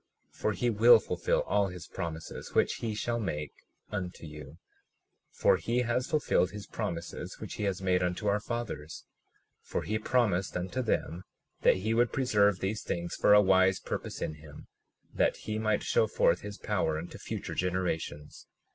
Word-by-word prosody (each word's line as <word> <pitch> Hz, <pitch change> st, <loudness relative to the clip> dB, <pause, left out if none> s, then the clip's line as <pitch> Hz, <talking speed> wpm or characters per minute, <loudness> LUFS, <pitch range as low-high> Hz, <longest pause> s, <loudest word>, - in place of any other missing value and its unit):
37:17 -, -, -22 dB
For 110 Hz, -, +2 dB
he 120 Hz, +6 st, 0 dB
will 115 Hz, +2 st, +7 dB
fulfil 90 Hz, -3 st, 0 dB
all 100 Hz, -1 st, +2 dB
his 90 Hz, -3 st, -8 dB
promises 80 Hz, -1 st, -6 dB
which -, -, +3 dB
he 110 Hz, -2 st, -3 dB
shall 120 Hz, +2 st, -1 dB
make 75 Hz, -8 st, -3 dB, 0.4 s
unto 90 Hz, -5 st, -4 dB
you, 75 Hz, -1 st, -10 dB, 0.7 s
for -, -, +3 dB
he 120 Hz, +2 st, 0 dB
has 125 Hz, +2 st, 0 dB
fulfilled 150 Hz, -, +2 dB
his 105 Hz, 0 st, -8 dB
promises 85 Hz, -6 st, -5 dB
which -, -, -6 dB
he 105 Hz, -, -3 dB
has 95 Hz, -1 st, -2 dB
made 90 Hz, -1 st, +2 dB
unto 90 Hz, +3 st, -1 dB
our 100 Hz, +1 st, +3 dB
fathers. 110 Hz, -9 st, -5 dB, 0.6 s
37:18 -, -, -25 dB
For -, -, -1 dB
he 110 Hz, +1 st, -1 dB
promised 105 Hz, -6 st, +1 dB
unto 90 Hz, +8 st, -2 dB
them 90 Hz, -7 st, -1 dB, 0.4 s
that -, -, +5 dB
he 105 Hz, +4 st, -1 dB
would 120 Hz, +1 st, +3 dB
preserve 105 Hz, -8 st, +2 dB
these 105 Hz, +3 st, -1 dB
things 85 Hz, 0 st, -3 dB
for 105 Hz, -, +5 dB
a 105 Hz, -, +8 dB
wise 95 Hz, 0 st, +4 dB
purpose -, -, -4 dB
in -, -, -2 dB
him, 75 Hz, -2 st, -12 dB, 0.5 s
that -, -, +2 dB
he 110 Hz, 0 st, -4 dB
might 110 Hz, 0 st, +1 dB
show -, -, +3 dB
forth -, -, +2 dB
his 105 Hz, 0 st, -7 dB
power 90 Hz, -7 st, 0 dB
unto 85 Hz, +3 st, -7 dB
future -, -, -5 dB
generations. 85 Hz, -5 st, -3 dB
95 Hz, 175 wpm, -30 LUFS, 90-110 Hz, 0.7 s, a